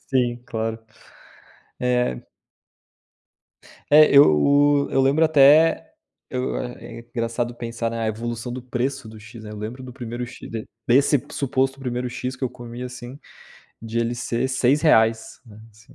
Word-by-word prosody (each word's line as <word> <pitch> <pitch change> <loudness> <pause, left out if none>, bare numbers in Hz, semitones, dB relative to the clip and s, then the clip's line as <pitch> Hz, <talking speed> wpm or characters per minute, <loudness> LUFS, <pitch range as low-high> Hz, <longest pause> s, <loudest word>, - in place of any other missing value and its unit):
Sim, 120 -2 0
claro. 110 -1 -3 1.0
É. 125 - 0 1.7
É, 150 0 +7
eu 140 - +5
eu 135 - +2
lembro 140 +4 +3
até 155 +1 +5 0.4
eu 125 0 -2
é 120 -1 -7
engraçado 120 0 -3
pensar 115 -1 -4
na 115 -1 -3
evolução 115 +2 -4
do 125 0 -6
preço 125 +1 -3
do 110 0 -12
X, 110 +2 -12
né. 105 - -8
Eu 105 - -8
lembro 115 +5 -7
do 130 -1 -9
primeiro 120 -1 -6
X 120 - -11
de 115 -1 -6 0.2
desse 135 +2 +3
suposto 135 0 -1
primeiro 125 -1 -3
X 125 +1 -5
que 130 - -4
eu 125 - -2
comi 120 -1 -9
assim, 125 +1 -8 0.6
de 115 +1 -4
ele 115 +1 -1
ser 120 +1 -2
R$6, 125 -4 +2
né, 110 -1 -14
assim. 110 +2 -21
120 Hz, 145 wpm, -22 LUFS, 115-130 Hz, 1.7 s, É